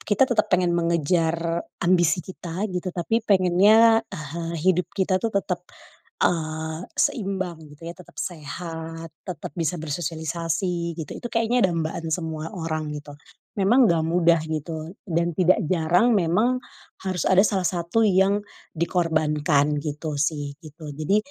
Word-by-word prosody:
kita 210 +5 +3
tetep 230 -4 +1
pengen 180 -1 +3
mengejar 170 0 +1 0.5
ambisi 175 -2 +4
kita 185 +1 -4
gitu 180 +1 -2
tapi 205 +6 0
pengennya 205 +5 +6
ehe 160 -2 -6 0.2
hidup 180 -1 +2
kita 190 -1 +1
tuh 230 - +1
tetep, 185 -3 -1 0.6
eee, 160 0 -1
seimbang 190 -6 -1 0.2
gitu 150 - -17
ya - - -4
tetep 180 - -16
sehat 165 0 -6 0.2
tetep 180 -6 -6
bisa 165 0 -1
bersosialisasi 165 +2 -2
gitu 155 - -6
itu 240 - -5
kayaknya 230 -2 +2
dambaan 165 0 -3
semua 160 -1 -3
orang 155 -3 -3
gitu, 145 0 -9 0.4
memang 235 +6 +5
nggak 165 -3 +2
mudah 170 0 +3
gitu 160 +2 -4
dan 170 0 +1
tidak 185 +3 +4
jarang 175 +7 +3
memang, 205 +8 +2 0.4
harus 185 -3 -2
ada 190 0 +5
salah 195 -3 +1
satu 175 +5 +1
yang, 200 +1 +3 0.3
dikorbankan 150 -3 +1
gitu 150 0 -4
sih 145 -1 -1
gitu 155 -1 -10
jadi, 155 +8 +1
170 Hz, 135 wpm, -24 LUFS, 160-190 Hz, 0.6 s, pengennya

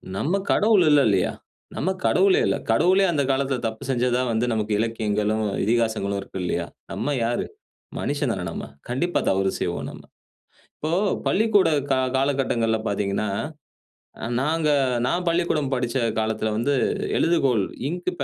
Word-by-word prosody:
நம்ம 175 - 0
கடவுள் 210 -3 +4
இல்ல 145 -1 +6
இல்லயா? 95 -3 +2 0.4
நம்ம 180 - -1 0.2
கடவுளே 190 +1 +4
இல்ல. - - +1 0.2
கடவுளே 185 +11 +4
அந்த 145 -4 +1
காலத்தில 135 -1 0
தப்பு 110 +3 -6
செஞ்சதா 125 0 +1
வந்து 115 +2 +1
நமக்கு 110 -1 -1
இலக்கியங்களும், 110 -1 0 0.2
இதிகாசங்களும் 110 -2 0
இருக்கு 95 - -8
இல்லயா? 85 -1 -1 0.3
நம்ம 145 -1 -2
யாரு? 120 +1 -1 0.5
மனிஷன் - - -1
தானே - - -4
நம்ம. - - -5 0.2
கண்டிப்பா 170 +9 0
தவறு 95 0 +2
செய்வோம் - - -2
நம்ம. - - -12 0.8
இப்போ 155 - -3 0.4
பள்ளிக்கூட 210 -4 +3 0.2
கா 130 - +2 0.2
காலகட்டங்கள்ல 130 -5 +1
பார்த்தீங்கன்னா. 100 +1 -1 1.0
அ - - -2 0.2
நாங்க 155 +2 +1 0.4
நான் 175 +5 0
பள்ளிக்கூடம் 165 -5 +1
படிச்ச 125 0 -1 0.2
காலத்தில 110 0 -1
வந்து 140 +5 +1 0.4
எழுதுகோள் 135 - +2 0.3
இங்க் 180 +2 -2
125 Hz, 135 wpm, -24 LUFS, 110-165 Hz, 1.0 s, இல்ல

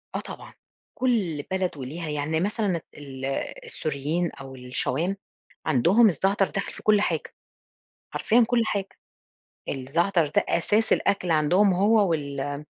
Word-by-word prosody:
آه - - 0
طبعًا، - - -9 0.5
كل 195 - +1
بلد 185 -4 -1
وليها 155 +5 -5
يعني 150 +2 -1
مثلًا 195 -2 0
ال 135 -2 -8 0.4
السوريين 155 +4 -2
أو 135 -1 -10
الشوام 135 +9 -2 0.5
عندهم 170 - +5
الزعتر 195 +2 +1
داخل 200 - -4
في - - -11
كل 210 -1 +4
حاجة، - - -2 0.8
حرفيًا 235 +2 +3
كل 240 -2 +2
حاجة، 200 -2 -1 0.8
الزعتر 165 +6 +1
ده 145 - +1
أساس 210 +6 +2
الأكل 180 -3 +1
عندهم 180 +6 +4
هو 205 0 +3
وال 140 -2 -2
170 Hz, 125 wpm, -25 LUFS, 145-200 Hz, 0.8 s, عندهم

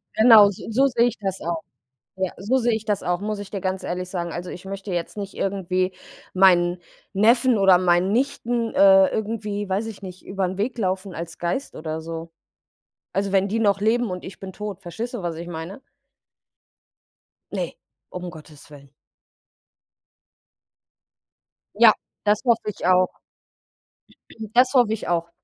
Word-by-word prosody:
Genau, 220 -3 +8
so 200 - -8
so 270 +5 +4
sehe 240 -2 +3
ich 245 - -4
das 195 -2 -3
auch. 165 -1 -3 0.6
Ja, 190 -1 0
so 215 +7 +1
sehe 240 -2 +1
ich 220 - -2
das 205 -3 -1
auch, 175 +1 -1
muss 210 0 -3
ich 205 -1 -8
dir 195 -3 -4
ganz 190 0 -2
ehrlich 180 +1 -4
sagen. 175 -2 -3
Also, 175 +2 -5
ich 180 - -9
möchte 195 0 -6
jetzt 175 +3 -3
nicht 200 -1 -6
irgendwie 185 -1 -1 0.4
meinen 180 -2 +4 0.3
Neffen 235 +4 +4
oder 190 -2 +6
meinen 180 +1 +2
Nichten, 240 -2 -1
äh, 195 -1 +7
irgendwie, 210 -2 -3
weiß 200 +4 0
ich 220 -3 -8
nicht, 185 -1 -10
über 190 -1 -1
den 185 - -5
Weg 235 +5 -2
laufen 190 -1 -2
als 170 0 -7
Geist 175 +11 -3
oder 155 0 -5
so. 165 0 -7 0.8
Also, 195 0 -1
wenn 195 0 +3
die 225 - -1
noch 200 -2 +2
leben 225 +1 +1
und 180 0 -5
ich 185 - -9
bin 190 -1 -7
tot. 205 -1 -6
Verstehst 220 +8 -6
du, 220 - -4
was 170 -2 -3
ich 170 +1 -7
meine? 170 +6 -7 1.7
Ne, - - -3 0.4
um 180 0 -6
Gottes 155 -3 -14
willen. 140 -2 -14 2.8
Ja, 220 0 +7 0.3
das 210 0 +2
hoffe 235 -3 +2
ich 200 - -6
auch. 185 0 +4 1.5
Das 250 +2 +5
hoffe 240 -4 +4
ich 220 - -5
auch. 170 -1 0
195 Hz, 165 wpm, -23 LUFS, 180-215 Hz, 2.8 s, Genau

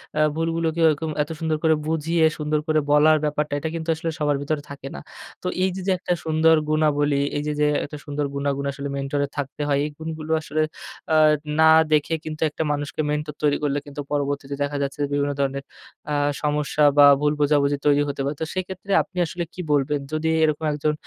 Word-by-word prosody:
অ্যা 155 - +3
ভুলগুলোকে 165 0 -1
এরকম 155 +1 0
এত - - -13
সুন্দর 160 -1 0
করে 160 -1 +4
বুঝিয়ে, 160 +1 +1
সুন্দর 150 0 0
করে 155 0 +3
বলার 155 +1 +6
ব্যাপারটা 150 0 -1
এটা, 160 - -3
কিন্তু 165 0 -5
আসলে 165 +1 -3
সবার 145 -1 +1
ভেতরে 145 +1 -2
থাকে 140 -1 -8
না। - - -6 0.4
তো - - -2 0.2
এই 190 - +3
যে, 190 - -5
যে - - +3
একটা 180 - -1
সুন্দর 160 0 +4
গুনাবলি, 145 -2 +2 0.2
এই - - -1
যে, 150 - 0
যে 150 - +3 0.2
একটা 150 +1 -8
সুন্দর 145 0 -2
গুনাগুণ 140 0 -1
আসলে 140 +1 -6
মেন্টর 140 +1 -2
এর - - -11
থাকতে 145 +1 -4
হয়। 140 -1 +2
এই - - -3
গুণগুলো 160 0 -6
আসলে 155 0 -2 0.5
আ - - +5 0.4
না 160 - +7 0.2
দেখে 150 +2 +2
কিন্তু, 155 -1 -6
একটা 150 - -3
মানুষকে 145 +1 -2
মেন্টর 150 0 -2
তৈরি 145 -1 +2
করলে, 145 -1 +1
কিন্তু 145 0 -7
পরবর্তীতে 140 -1 -2
দেখা 145 0 -2
যাচ্ছে 140 +1 -5
বিভিন্ন 145 0 +1
ধরনের 140 0 -1 0.5
আ - - 0 0.3
সমস্যা 150 0 0
বা 145 - +9 0.2
ভুল 150 0 +2
বোঝাবুঝি 145 -1 +2
তৈরি 145 0 +4
হতে 140 - -3
পারে। 140 +2 -2
তো 160 - 0
সেক্ষেত্রে 185 +1 -5
আপনি 185 - -18
আসলে 175 +2 -4
কি 180 - -6
বলবেন? 145 0 +1
যদি 155 +1 0
এরকম 155 0 +1
একজন 150 +1 0
150 Hz, 200 wpm, -23 LUFS, 145-160 Hz, 0.5 s, বা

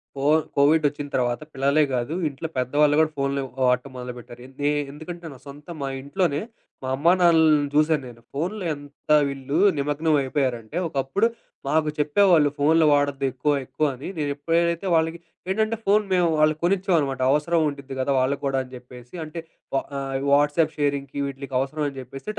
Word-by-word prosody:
CoV 145 +3 +3 0.2
Covid 150 +2 +4
వచ్చిన 145 0 -5
తర్వాత 120 -1 0
పిల్లలే 140 +3 +2
గాదు. 125 +4 -1 0.2
ఇంట్లో 140 +3 -6
పెద్దవాళ్ళు 145 +4 +2
గూడా 155 0 +3
ఫోన్లు 140 0 -1 0.2
వాడటం 125 +2 +1
మొదలుపెట్టారు. 125 -1 -9
ఎందు 135 +2 -13
నే 145 - +3 0.2
ఎందుకంటే 170 +4 -9
నా 130 - -13
సొంత 145 +3 -12
మా 135 - -2 0.2
ఇంట్లోనే 145 0 0 0.4
మా 130 - -4
అమ్మా, 165 +6 +3
నాన్నల్ని 160 -4 +4
జూసాను 150 -1 +3
నేను. 115 -1 -13
ఫోన్‌లో 180 +8 -3
ఎంత 145 +1 -8 0.2
వీళ్ళు 140 +1 -4 0.2
నిమగ్నం 150 +3 +1
అయిపోయారంటే, 130 -1 -2
ఒకప్పుడు 140 +10 0 0.4
మాకు 155 +1 +2
చెప్పేవాళ్ళు 155 0 +4
"ఫోన్‌లు 155 +3 +4
వాడొద్దు 145 -1 +1
ఎక్కువ 135 +4 0
ఎక్కువ" 155 - -1
అని 130 - -8
నేనెప్పుడైతే 165 +4 0
వాళ్ళకి 165 +1 +1 0.3
ఏంటంటే 220 +3 +1
ఫోన్ 210 +2 +4
మేము 180 -2 +3
వాళ్ళకి 155 0 +3
కొనిచ్చామనమాట. 175 -8 +1
అవసరం 160 +3 +2
ఉండిద్ది 140 -2 -6
గదా! 135 +2 0
వాళ్ళకి 135 +2 0
గూడా 135 -1 +1
అని 130 - -15
జెప్పేసి 125 +2 -13
అంటే 155 +2 -7 0.4
వా 135 - +2 0.2
ఆహ్, 135 -1 -3
వాట్సాప్ 150 +2 +3
షేరింగ్‌‌‌కి 140 -2 -2
వీటిలకి 135 -1 -7
అవసరమని 145 +1 -2
జెప్పేసి, 130 - -10
145 Hz, 160 wpm, -24 LUFS, 135-160 Hz, 0.4 s, Covid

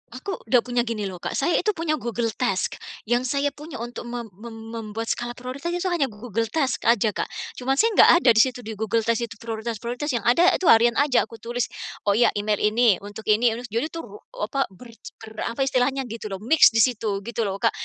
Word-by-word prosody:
aku 370 +10 -5
udah 240 +1 +4
punya 245 -1 0
gini 220 -3 -2
loh 185 -2 -7
Kak, - - -4
saya 290 +5 +1
itu 425 - +1
punya 325 -2 0
Google 230 -1 -2
Task, 195 -7 -1 0.3
yang 240 +2 +2
saya 280 +2 0
punya 305 +2 -10
untuk 240 +1 -6
mem 240 -1 -5
mem 230 0 -9 0.2
membuat 225 0 -5
skala 240 0 -3
prioritas 255 +6 -6
itu 355 +1 -2
hanya 320 -6 +1
Google 225 +1 -3
Task 280 -6 0
aja 225 -2 +4
Kak. - - -2 0.3
Cuma 265 +2 0
saya 455 - +4
enggak - - +8
ada - - +6
di - - +5
situ, 255 -1 -3
di 220 - -6
Google 220 +1 0
Task 230 0 +1
itu 225 - -11
prioritas-prioritas, 235 +4 -4
yang 230 - -2
ada 335 +9 +5
itu - - -4
harian 235 +1 +5
aja 285 -3 +3
aku 230 - -11
tulis, 240 +1 -2 0.4
oh 200 - +4
iya, 235 0 +4
email 210 0 0
ini, 220 0 +4
untuk 205 +2 -9
ini, 225 +3 +4
aduh 245 - -7
jadi 230 +7 -1
itu 330 - -6 0.4
apa 270 +6 0
ber 230 +6 -14 0.3
ber 220 - -10 0.2
apa - - -3
istilahnya 270 +1 +1
gitu 225 -1 -6
loh, 195 - -4
mix 315 +7 +7
di 225 - +1
situ 215 -5 0
gitu 235 -1 -2
loh 195 0 -4
Kak. - - +3
235 Hz, 220 wpm, -24 LUFS, 220-260 Hz, 0.4 s, enggak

